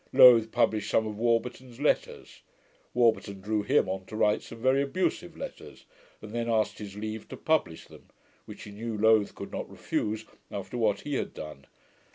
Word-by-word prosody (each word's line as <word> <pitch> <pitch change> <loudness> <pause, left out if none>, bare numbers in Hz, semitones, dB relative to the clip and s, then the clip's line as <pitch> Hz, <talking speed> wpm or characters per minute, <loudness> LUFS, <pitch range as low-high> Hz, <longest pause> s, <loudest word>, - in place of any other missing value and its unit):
Lowth 115 -3 +8
published 110 -1 +1
some 110 - +2
of 105 -1 -5
Warburton's 120 +1 -1
letters. 150 - -1 0.5
Warburton 110 -4 +2
drew 105 +2 -1
HIM 135 +8 +2
on 95 0 -4
to 110 - -8
write 105 -1 +2
some - - -11
very 130 +3 +3
abusive 155 - -2
letters, - - -9 0.4
and 105 - -8
then 115 0 -2
asked 110 -2 +1
his 100 -2 -8
leave 110 +1 -5
to - - -8
publish 155 - 0
them; - - -16 0.4
which - - -10
he 105 - -9
knew 110 +2 -5
Lowth 110 -1 +4
could - - -8
not - - -5
refuse, 110 +1 -2 0.2
after 100 +4 -6
what 110 -4 +1
he 145 - -5
had - - -2
done. 75 -3 -9
110 Hz, 180 wpm, -28 LUFS, 105-120 Hz, 0.5 s, Lowth